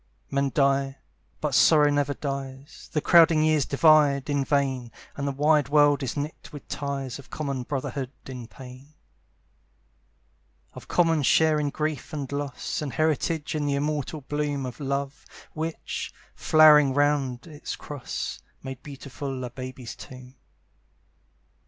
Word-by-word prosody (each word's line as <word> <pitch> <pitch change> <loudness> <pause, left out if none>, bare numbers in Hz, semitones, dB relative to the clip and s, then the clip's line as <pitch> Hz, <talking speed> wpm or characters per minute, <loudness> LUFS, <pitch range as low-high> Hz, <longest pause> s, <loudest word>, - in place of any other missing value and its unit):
Men 140 0 +1
die, 135 -1 +2 0.4
but - - -1
sorrow 150 -2 +5
never 145 -1 0
dies; 135 0 -6
The 150 - 0
crowding 165 -2 +6
years 155 -3 +2
divide 145 -2 +4
in 140 -1 +1
vain, 135 -4 0 0.2
And 140 0 -3
the - - 0
wide 145 0 +2
world 145 -1 +4
is 135 +1 -3
knit 145 +2 -5
with 145 -2 -10
ties 140 -3 -4
Of 130 - -14
common 140 -4 -3
brotherhood 135 0 -4 0.2
in 125 -3 -8
pain; 130 +4 -13 1.8
Of - - -11
common 165 -3 +2
share 155 +2 +4
in 145 -1 0
grief 155 +1 -3
and 145 -3 -4
loss, 140 0 -3
And 145 -3 -4
heritage 155 0 0
in 150 -2 -1
the 140 - +1
immortal 150 +1 -2
bloom 145 -1 -2
Of 125 -2 -7
Love, 140 0 -3 0.3
which, 160 +1 -4 0.2
flowering 150 -3 +6
round 140 -3 +1
its 155 -3 -7
cross, 145 -4 -5 0.2
Made 135 -1 -7
beautiful 135 -1 -6
a 125 - -5
baby's 130 -1 -7
tomb. 130 -1 -12
140 Hz, 140 wpm, -26 LUFS, 135-150 Hz, 1.8 s, crowding